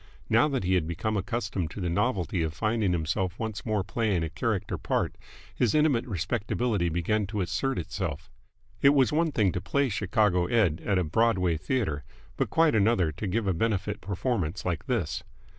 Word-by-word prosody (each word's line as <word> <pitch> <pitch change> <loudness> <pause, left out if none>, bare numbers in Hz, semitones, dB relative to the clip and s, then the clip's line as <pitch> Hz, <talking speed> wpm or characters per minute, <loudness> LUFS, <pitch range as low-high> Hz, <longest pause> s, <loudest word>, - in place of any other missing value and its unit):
Now 115 +5 +5
that 135 -6 -1
he 95 +1 +1
had 90 -4 +2
become 90 +6 -2
accustomed 100 -4 -2
to 105 - -8
the 90 - -1
novelty 95 - 0
of 80 -1 -2
finding 105 +1 +1
himself 85 +2 -1
once 110 -2 -4
more 105 -3 +1
playing 100 -2 0
a 80 - -3
character 100 +3 -1
part, - - -1 0.4
his 120 0 +1
intimate 150 -6 +3
respectability 105 0 -1
began 95 +5 0
to 105 0 -2
assert 110 +9 -1
itself. 85 - -4 0.5
It 140 +1 +6
was 130 -5 +4
one 160 +1 +2
thing 105 -8 +2
to 90 - -3
play 140 +4 +1
Chicago 95 -3 +1
Ed. 95 -9 +2
at 100 -2 +1
a 90 - +2
Broadway 90 0 +2
theatre, 80 - -1 0.3
but - - -1
quite 165 -1 +3
another 105 -6 +3
to 95 +7 -5
give 105 +4 0
a 95 - +2
benefit 105 +1 -1
performance 100 -3 -2
like 85 -4 -2
this. - - -1
100 Hz, 180 wpm, -28 LUFS, 90-115 Hz, 0.5 s, It